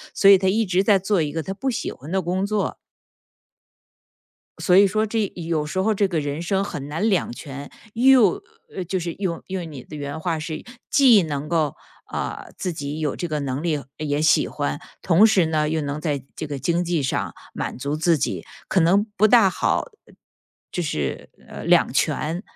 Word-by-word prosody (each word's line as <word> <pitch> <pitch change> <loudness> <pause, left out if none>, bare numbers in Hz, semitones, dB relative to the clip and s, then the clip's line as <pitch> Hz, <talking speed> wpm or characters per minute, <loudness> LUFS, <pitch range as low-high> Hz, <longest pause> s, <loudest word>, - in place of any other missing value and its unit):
所 195 - +4
以 195 -1 +8
他 190 - 0
一 220 +3 +2
直 185 -1 +2
在 200 -1 +5
做 195 -1 +1
一 150 -2 -1
个 160 +1 -3
他 195 - -4
不 265 +7 -2
喜 240 - -2
欢 145 +6 -10
的 190 - +2
工 180 +3 -1
作。 205 0 -1 1.9
所 180 - +4
以 200 - +8
说 215 +3 +1
这 215 -2 -1
有 165 -3 -2
时 185 +5 -3
候 220 +3 +2
这 200 -1 +2
个 170 -4 -1
人 145 +1 -3
生 195 +2 0
很 145 -8 -5
难 165 +9 0
两 190 - +1
全， 140 +3 -8 0.2
又 245 -5 +5 0.5
就 185 -1 -1
是 170 -1 -4
用 180 -3 -3
用 185 -3 -4
你 135 -4 -9
的 - - -10
原 145 +1 -5
话 165 0 -1
是， 155 0 -5 0.3
既 245 -8 +6
能 150 -1 -4
够， 160 -4 +1 0.4
呃， - - -4
自 185 - -2
己 150 -1 -5
有 150 -3 -1
这 175 - -3
个 155 -2 -2
能 140 +1 -3
力， 155 -5 -1
也 150 -1 -1
喜 155 - +4
欢， 70 - -3 0.2
同 180 +6 +5
时 195 -7 +4
呢， 155 -1 +1
又 160 0 0
能 145 +1 -3
在 145 -5 -2
这 - - -4
个 145 -2 -5
经 170 +6 0
济 170 -3 0
上 135 - -2 0.2
满 - - -4
足 140 +3 -2
自 165 +1 +2
己， 130 - -2 0.2
可 190 - +2
能 185 +5 +4
不 215 - +5
大 215 -3 +6
好， - - 0 1.1
就 75 - 0
是， 65 - -5 0.2
呃， - - -8
两 - - +4
全。 165 +4 0
170 Hz, 215 characters per minute, -23 LUFS, 150-195 Hz, 1.9 s, 以